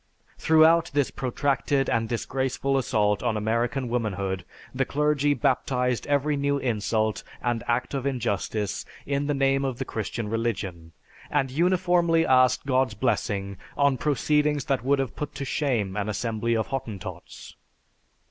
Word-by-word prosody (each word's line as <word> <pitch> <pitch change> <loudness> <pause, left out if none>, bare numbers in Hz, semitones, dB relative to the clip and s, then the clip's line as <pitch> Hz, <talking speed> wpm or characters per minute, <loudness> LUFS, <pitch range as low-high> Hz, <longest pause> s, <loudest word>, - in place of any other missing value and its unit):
"Throughout 160 +1 +5
this 145 -2 +2
protracted 135 +1 0
and 115 -1 0
disgraceful 130 +3 -1
assault 105 -6 +1
on 120 -3 0
American 115 +4 0
womanhood 100 -6 -2 0.3
the 135 +1 +1
clergy 145 +1 +1
baptised 125 -2 0
every 145 +1 +1
new 140 0 +1
insult 110 -3 0 0.2
and 120 -1 -1
act 120 +3 0
of 135 -1 -1
injustice 105 -5 -2 0.2
in 140 0 -1
the 145 - +1
name 135 0 +2
of 130 -3 -2
the 135 - -3
Christian 110 0 -4
religion, 100 -7 -3 0.4
and 135 -3 0
uniformly 175 +1 +3
asked 130 -1 +4
God's 130 -4 +1
blessing 100 -4 -1 0.2
on 140 -1 +3
proceedings 150 +1 +1
that 135 -3 0
would 140 +2 +3
have 135 -2 -2
put 150 - -5
to 140 - -4
shame 120 -10 -1
an 105 0 -2
assembly 115 +1 -1
of 110 - 0
Hottentots." 120 -8 -7
130 Hz, 140 wpm, -26 LUFS, 110-140 Hz, 0.4 s, Throughout